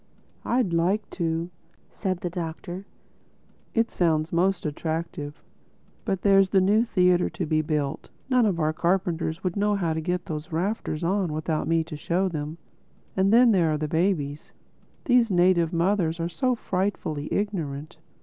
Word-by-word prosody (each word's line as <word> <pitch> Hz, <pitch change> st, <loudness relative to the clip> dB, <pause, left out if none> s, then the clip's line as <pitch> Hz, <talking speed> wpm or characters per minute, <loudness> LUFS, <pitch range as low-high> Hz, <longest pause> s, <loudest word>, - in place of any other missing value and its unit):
"I'd 240 Hz, -8 st, +1 dB
like 190 Hz, +5 st, +1 dB
to," 165 Hz, 0 st, -2 dB, 0.4 s
said 185 Hz, -3 st, -3 dB
the 175 Hz, -, -2 dB
Doctor. 175 Hz, +2 st, -6 dB, 0.9 s
"It 230 Hz, 0 st, +2 dB
sounds 160 Hz, -2 st, +1 dB
most 180 Hz, +1 st, +1 dB
attractive. 155 Hz, -1 st, -4 dB, 0.6 s
But 190 Hz, -2 st, -1 dB
there's 195 Hz, -1 st, +5 dB
that 195 Hz, -, +4 dB
new 210 Hz, +4 st, +4 dB
theatre 180 Hz, -5 st, +3 dB
to 175 Hz, -, -4 dB
be 155 Hz, 0 st, +1 dB
built; 150 Hz, -3 st, -2 dB, 0.2 s
none 250 Hz, -4 st, +3 dB
of 180 Hz, -4 st, 0 dB
our 155 Hz, 0 st, +1 dB
carpenters 170 Hz, -1 st, -1 dB
would 180 Hz, -2 st, -1 dB
know 205 Hz, 0 st, +2 dB
how 170 Hz, -5 st, 0 dB
to 160 Hz, -, -2 dB
get 180 Hz, +2 st, -2 dB
those 155 Hz, 0 st, -5 dB
rafters 170 Hz, -2 st, -2 dB
on 185 Hz, -2 st, 0 dB
without 155 Hz, 0 st, -2 dB
me 165 Hz, 0 st, +2 dB
to 160 Hz, -1 st, -8 dB
show 175 Hz, +5 st, 0 dB
them—And 170 Hz, +4 st, -4 dB
then 235 Hz, +1 st, +6 dB
there 170 Hz, -6 st, +3 dB
are -, -, 0 dB
the 155 Hz, 0 st, -2 dB
babies: 155 Hz, -3 st, -1 dB, 0.5 s
these 245 Hz, -3 st, +4 dB
native 175 Hz, -3 st, +3 dB
mothers 170 Hz, -1 st, +1 dB
are 165 Hz, +1 st, -1 dB
so 250 Hz, +9 st, 0 dB
frightfully 185 Hz, -8 st, -2 dB
ignorant." 155 Hz, -8 st, -3 dB
175 Hz, 155 wpm, -26 LUFS, 160-195 Hz, 0.9 s, then